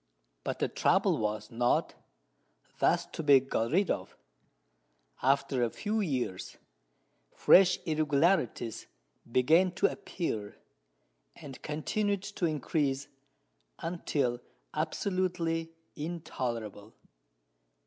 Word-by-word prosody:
But -, -, -3 dB
the -, -, 0 dB
trouble -, -, +2 dB
was 105 Hz, 0 st, -2 dB
not 120 Hz, +1 st, +1 dB, 0.9 s
thus -, -, +3 dB
to -, -, -6 dB
be 145 Hz, -3 st, +7 dB
got 120 Hz, -3 st, -1 dB
rid 190 Hz, +5 st, +2 dB
of. -, -, -4 dB, 1.0 s
After 135 Hz, -1 st, +2 dB
a 120 Hz, -, +1 dB
few 215 Hz, -, -2 dB
years 130 Hz, -, -3 dB, 0.8 s
fresh 185 Hz, -1 st, +6 dB
irregularities 155 Hz, -, +1 dB, 0.4 s
began 160 Hz, +10 st, +4 dB
to 190 Hz, -, +1 dB
appear, 110 Hz, -, -4 dB, 0.8 s
and 140 Hz, -4 st, -10 dB
continued 200 Hz, +6 st, -1 dB
to 200 Hz, -4 st, -2 dB
increase 145 Hz, -3 st, -1 dB, 0.7 s
until 145 Hz, -8 st, -1 dB, 0.3 s
absolutely 165 Hz, 0 st, -1 dB, 0.3 s
"intolerable." 120 Hz, -, -5 dB
150 Hz, 90 wpm, -30 LUFS, 125-175 Hz, 1.0 s, be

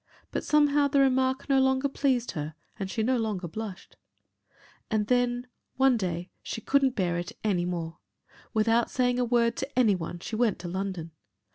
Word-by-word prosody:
But -, -, -2 dB
somehow 295 Hz, -1 st, +4 dB
the 280 Hz, 0 st, +2 dB
remark 265 Hz, -1 st, +2 dB
no 275 Hz, -2 st, +4 dB
longer 265 Hz, +1 st, +3 dB
pleased 265 Hz, -3 st, 0 dB
her 155 Hz, -2 st, -5 dB, 0.2 s
and 195 Hz, -1 st, -3 dB
she 220 Hz, -, -1 dB
no 255 Hz, +3 st, +2 dB
longer 210 Hz, -6 st, -2 dB
blushed. 205 Hz, +2 st, -7 dB, 0.9 s
And 215 Hz, -1 st, +1 dB
then, 245 Hz, +1 st, +1 dB, 0.3 s
one 265 Hz, -1 st, +4 dB
day 180 Hz, -4 st, -3 dB
she -, -, -5 dB
couldn't 270 Hz, +2 st, +2 dB
bear 175 Hz, -3 st, 0 dB
it 175 Hz, -, -6 dB
any 185 Hz, -5 st, +1 dB
more. 170 Hz, -2 st, -4 dB, 0.5 s
Without 225 Hz, +2 st, +2 dB
saying 245 Hz, -1 st, +1 dB
a -, -, +3 dB
word 235 Hz, -1 st, +2 dB
to 270 Hz, -1 st, -5 dB
any 225 Hz, -5 st, +5 dB
one 175 Hz, -1 st, -4 dB
she 195 Hz, +6 st, -6 dB
went 225 Hz, -2 st, +2 dB
to 175 Hz, -, -7 dB
London. 185 Hz, -2 st, -4 dB
230 Hz, 175 wpm, -28 LUFS, 185-260 Hz, 0.9 s, any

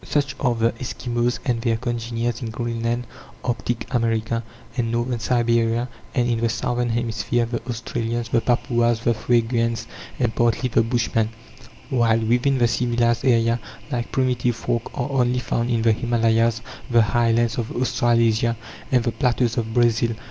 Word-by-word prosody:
Such 145 Hz, -1 st, 0 dB
are 125 Hz, -3 st, +1 dB
the 115 Hz, 0 st, +2 dB
Eskimos 120 Hz, -1 st, -1 dB
and 120 Hz, -4 st, 0 dB
their 115 Hz, -2 st, +1 dB
congeners 120 Hz, 0 st, -2 dB
in 115 Hz, -, -3 dB
Greenland, 120 Hz, +1 st, -2 dB, 0.4 s
Arctic 120 Hz, -1 st, -2 dB
America, 115 Hz, -1 st, 0 dB, 0.3 s
and 115 Hz, -2 st, -1 dB
Northern 120 Hz, +1 st, -1 dB
Siberia; 115 Hz, 0 st, +1 dB, 0.3 s
and, 120 Hz, -1 st, +2 dB
in 120 Hz, -1 st, 0 dB
the 115 Hz, 0 st, +1 dB
Southern 120 Hz, +1 st, -1 dB
hemisphere, 115 Hz, 0 st, 0 dB
the 115 Hz, 0 st, -3 dB
Australians, 115 Hz, 0 st, -3 dB
the 115 Hz, -, +2 dB
Papuas, 120 Hz, -1 st, +1 dB
the 120 Hz, -, +3 dB
Fuegians, 115 Hz, 0 st, +1 dB, 0.3 s
and, 120 Hz, -3 st, 0 dB
partly, 120 Hz, +2 st, +1 dB
the 115 Hz, -, +3 dB
Bushmen; 115 Hz, -1 st, 0 dB, 0.6 s
while 115 Hz, -3 st, +3 dB
within 120 Hz, +4 st, +2 dB
the 120 Hz, -1 st, +4 dB
civilized 120 Hz, 0 st, +1 dB
area, 115 Hz, -2 st, +3 dB, 0.3 s
like 120 Hz, -2 st, -2 dB
primitive 125 Hz, -2 st, +1 dB
folk 120 Hz, -1 st, -2 dB
are 135 Hz, 0 st, -2 dB
only 125 Hz, -2 st, +2 dB
found 120 Hz, -1 st, -1 dB
in 115 Hz, -2 st, +1 dB
the 115 Hz, -, +5 dB
Himalayas, 115 Hz, 0 st, +2 dB, 0.3 s
the 120 Hz, -2 st, +5 dB
highlands 115 Hz, +2 st, +2 dB
of 115 Hz, -, -2 dB
Australasia, 115 Hz, -2 st, +2 dB, 0.3 s
and 125 Hz, -3 st, +3 dB
the 120 Hz, -, 0 dB
plateaus 120 Hz, 0 st, +1 dB
of 110 Hz, -1 st, -1 dB
Brazil. 115 Hz, -1 st, +2 dB
120 Hz, 155 wpm, -22 LUFS, 115-120 Hz, 0.6 s, the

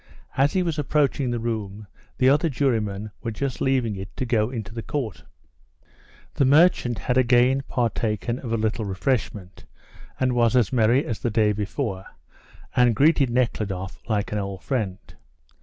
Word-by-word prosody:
As 140 Hz, +2 st, +2 dB
he 185 Hz, -, +2 dB
was 165 Hz, -3 st, -2 dB
approaching 145 Hz, -2 st, +1 dB
the 120 Hz, -, -1 dB
room, 110 Hz, -3 st, -4 dB, 0.3 s
the 130 Hz, -, +3 dB
other 150 Hz, +5 st, +4 dB
jurymen 110 Hz, -7 st, -1 dB
were 115 Hz, -, -3 dB
just 130 Hz, +4 st, -4 dB
leaving 130 Hz, -5 st, +1 dB
it 95 Hz, +1 st, -9 dB
to 130 Hz, -, -2 dB
go 110 Hz, -2 st, +1 dB
into 110 Hz, -4 st, -6 dB
the 115 Hz, -, -5 dB
court. 115 Hz, -, -4 dB, 1.1 s
The -, -, +1 dB
merchant 140 Hz, -4 st, +4 dB
had 125 Hz, +1 st, 0 dB
again 125 Hz, +2 st, +4 dB
partaken 115 Hz, 0 st, -1 dB
of 120 Hz, -, -6 dB
a 115 Hz, -, +1 dB
little 110 Hz, +1 st, -1 dB
refreshment, 100 Hz, -2 st, -3 dB, 0.5 s
and 130 Hz, -1 st, +1 dB
was 120 Hz, 0 st, +2 dB
as 120 Hz, -5 st, +2 dB
merry 120 Hz, +5 st, +3 dB
as 115 Hz, -8 st, -4 dB
the 120 Hz, -, -1 dB
day 110 Hz, -1 st, +2 dB
before, 105 Hz, -1 st, -3 dB, 0.7 s
and 125 Hz, -2 st, +4 dB
greeted 140 Hz, +1 st, +4 dB
Nekhludoff 105 Hz, -6 st, -2 dB
like 105 Hz, -2 st, -1 dB
an 105 Hz, -, -1 dB
old 100 Hz, -1 st, -5 dB
friend. 105 Hz, -9 st, -2 dB
120 Hz, 160 wpm, -24 LUFS, 105-130 Hz, 1.1 s, other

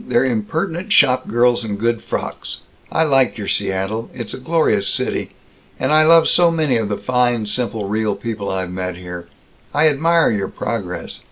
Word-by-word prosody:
They're 120 Hz, +1 st, +2 dB
impertinent 160 Hz, -, -2 dB
shopgirls 125 Hz, -2 st, +3 dB
in 105 Hz, -2 st, -3 dB
good 115 Hz, +2 st, -1 dB
frocks. -, -, -5 dB, 0.3 s
I 160 Hz, -, +2 dB
like 135 Hz, -6 st, +2 dB
your 105 Hz, -2 st, -5 dB
Seattle. 95 Hz, +4 st, -1 dB
It's 120 Hz, -4 st, -5 dB
a -, -, -6 dB
glorious 130 Hz, -9 st, +1 dB
city. -, -, -1 dB, 0.5 s
And -, -, +1 dB
I 155 Hz, 0 st, +6 dB
love 165 Hz, 0 st, +6 dB
so 175 Hz, -1 st, +4 dB
many 155 Hz, -6 st, +1 dB
of 110 Hz, -2 st, -2 dB
the 100 Hz, -, -2 dB
fine, 120 Hz, -3 st, 0 dB
simple, 110 Hz, -1 st, -2 dB
real 105 Hz, 0 st, -1 dB
people 105 Hz, -1 st, -5 dB
I've 95 Hz, -2 st, -3 dB
met 90 Hz, 0 st, -4 dB
here. 90 Hz, -1 st, -8 dB, 0.5 s
I 150 Hz, +2 st, +5 dB
admire 165 Hz, +3 st, +2 dB
your 100 Hz, -3 st, -1 dB
progress. 95 Hz, -6 st, -5 dB
115 Hz, 170 wpm, -19 LUFS, 100-145 Hz, 0.5 s, I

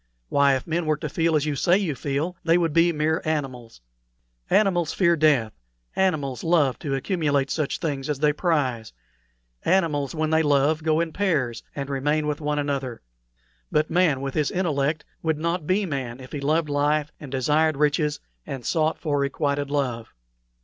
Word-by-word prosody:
Why, 140 Hz, -1 st, +4 dB
if 130 Hz, -, -4 dB
men 165 Hz, 0 st, -2 dB
were 155 Hz, -1 st, +2 dB
to 155 Hz, -, -4 dB
feel 165 Hz, +2 st, +1 dB
as 150 Hz, -1 st, +2 dB
you 150 Hz, -1 st, -1 dB
say 175 Hz, +6 st, +3 dB
you 190 Hz, -7 st, -1 dB
feel, 145 Hz, +6 st, -2 dB
they 165 Hz, +1 st, +4 dB
would 165 Hz, -3 st, 0 dB
be 170 Hz, +1 st, +4 dB
mere 155 Hz, 0 st, 0 dB
animals. 130 Hz, -, -4 dB, 0.7 s
Animals 180 Hz, -6 st, +2 dB
fear 170 Hz, -3 st, +3 dB
death; 145 Hz, -9 st, +3 dB, 0.4 s
animals 150 Hz, -9 st, 0 dB
love 160 Hz, -6 st, +2 dB
to 140 Hz, -4 st, -2 dB
accumulate 140 Hz, -2 st, 0 dB
such 155 Hz, -3 st, -1 dB
things 140 Hz, -3 st, -3 dB
as 150 Hz, -, 0 dB
they 150 Hz, +1 st, +2 dB
prize; 140 Hz, -, -1 dB, 0.7 s
animals, 160 Hz, -7 st, +1 dB
when 155 Hz, 0 st, -1 dB
they 160 Hz, 0 st, +4 dB
love, 145 Hz, +1 st, +2 dB
go 155 Hz, +1 st, +2 dB
in 165 Hz, -2 st, -3 dB
pairs, 145 Hz, -, 0 dB
and 140 Hz, -1 st, -4 dB
remain 145 Hz, +3 st, 0 dB
with 150 Hz, 0 st, -2 dB
one 150 Hz, 0 st, -1 dB
another. 140 Hz, -4 st, -3 dB, 0.7 s
But 155 Hz, +1 st, +1 dB
man, 165 Hz, -6 st, +2 dB
with 135 Hz, -1 st, -3 dB
his 150 Hz, -2 st, +1 dB
intellect, 155 Hz, -4 st, -1 dB, 0.2 s
would 160 Hz, -2 st, 0 dB
not 170 Hz, 0 st, -2 dB
be 195 Hz, +2 st, +2 dB
man 130 Hz, -7 st, -4 dB
if 130 Hz, -1 st, -11 dB
he 145 Hz, -, -4 dB
loved 155 Hz, +3 st, +1 dB
life 145 Hz, +1 st, +1 dB
and 145 Hz, -4 st, -9 dB
desired 150 Hz, +3 st, +2 dB
riches 150 Hz, 0 st, +1 dB, 0.3 s
and 135 Hz, -5 st, -6 dB
sought 160 Hz, -1 st, +1 dB
for 145 Hz, -3 st, -1 dB
requited 140 Hz, 0 st, -1 dB
love." 125 Hz, -6 st, -2 dB
150 Hz, 175 wpm, -24 LUFS, 140-160 Hz, 0.7 s, Why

